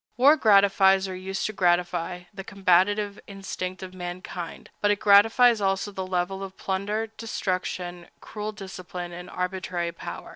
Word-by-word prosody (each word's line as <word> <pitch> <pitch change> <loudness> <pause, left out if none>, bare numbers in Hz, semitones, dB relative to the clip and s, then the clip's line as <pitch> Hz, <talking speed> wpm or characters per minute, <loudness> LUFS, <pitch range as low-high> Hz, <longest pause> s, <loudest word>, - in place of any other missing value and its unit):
War 280 +5 +7
gratifies, 195 -5 +5
or 185 - -5
used 190 +1 -4
to 215 - -2
gratify, 175 -1 0
the 195 0 -7
combative 200 +2 +2
instinct 190 -2 -6
of 185 0 -8
mankind, 175 -1 -7
but 205 - +3
it 205 0 +2
gratifies 225 +3 +6
also 195 +1 0
the 190 -1 -5
love 180 0 0
of 195 0 -7
plunder, 200 +3 -2
destruction, 180 -5 -3
cruel 210 0 -6
discipline, 185 -3 -7
and 175 +1 -9
arbitrary 180 -2 -3
power. 170 - -8
190 Hz, 145 wpm, -26 LUFS, 180-205 Hz, -, War